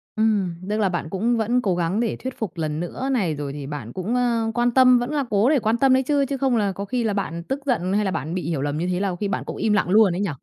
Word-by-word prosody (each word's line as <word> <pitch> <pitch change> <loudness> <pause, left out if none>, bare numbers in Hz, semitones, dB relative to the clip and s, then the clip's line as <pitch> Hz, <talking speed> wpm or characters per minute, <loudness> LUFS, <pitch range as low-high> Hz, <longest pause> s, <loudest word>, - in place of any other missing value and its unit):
Ừm, 210 -5 +1 0.2
tức 210 - 0
là 205 -3 +2
bạn 175 -3 -3
cũng 230 +5 0
vẫn 235 +3 +1
cố 190 -6 0
gắng 175 +4 0
để 230 -2 0
thuyết 260 0 -7
phục 195 -6 -4
lần 155 -2 -2
nữa 215 +10 -4
này, 190 - 0
rồi 140 -1 -5
thì 145 -2 -6
bạn 140 -6 -6
cũng, 195 +7 -2
ơ, 235 -2 +1
quan 240 +1 +1
tâm 255 -1 +6
vẫn 245 +4 -3
là 295 -2 0
cố 210 +4 +3
để 290 -3 +3
quan 220 +1 +1
tâm 265 +1 +4
đấy 260 0 +3
chứ, 285 0 +1
chứ 275 0 -3
không 265 -2 +1
là 205 -3 +1
có 200 +2 -5
khi 240 +3 -1
là 215 - 0
bạn 170 -4 -3
tức 270 +8 -3
giận 195 -8 0
hay 210 0 +1
là 190 - 0
bạn 155 0 -3
bị 185 - -2
hiểu 155 -5 -1
lầm 145 +1 -2
như 175 +3 -1
thế 180 0 -1
là 195 0 0
có 180 - -3
khi 205 - -3
bạn 195 - -2
cũng - - -6
im 215 - +1
lặng 205 -3 +1
luôn 205 -1 +5
ấy 195 - -2
nhỉ? 200 - 0
210 Hz, 320 wpm, -23 LUFS, 175-245 Hz, 0.2 s, tâm